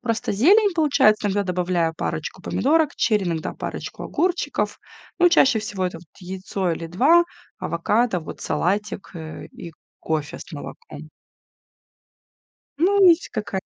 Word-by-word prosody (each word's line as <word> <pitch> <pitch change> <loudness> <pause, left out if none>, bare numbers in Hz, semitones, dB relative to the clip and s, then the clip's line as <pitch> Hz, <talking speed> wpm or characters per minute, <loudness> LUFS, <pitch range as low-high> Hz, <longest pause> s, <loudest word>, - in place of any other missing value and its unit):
Просто 230 -3 -2
зелень 390 - +5
получается, 270 -10 +3
иногда 200 +1 0
добавляю 180 -3 0
парочку - - -4
помидорок 310 +1 +1
черри, 210 -4 +2
иногда 165 -2 -2
парочку - - -6
огурчиков. 360 0 -1 0.4
Ну, 355 0 +6
чаще 270 -8 +4
всего 205 -3 -3
это 175 - -6
вот 165 - -17
яйцо 185 0 -3
или 165 0 -5
2, 290 - +4 0.3
авокадо, 205 +4 0
вот 155 - -9
салатик, 200 +2 -2
э, 160 -1 -8
и 170 - -9 0.3
кофе 155 -2 -3
с - - -11
молоком. 475 - -9 1.7
Ну, 390 +5 +4
есть 335 0 +3
какая-то 200 -3 -4
210 Hz, 130 wpm, -23 LUFS, -, 1.7 s, Ну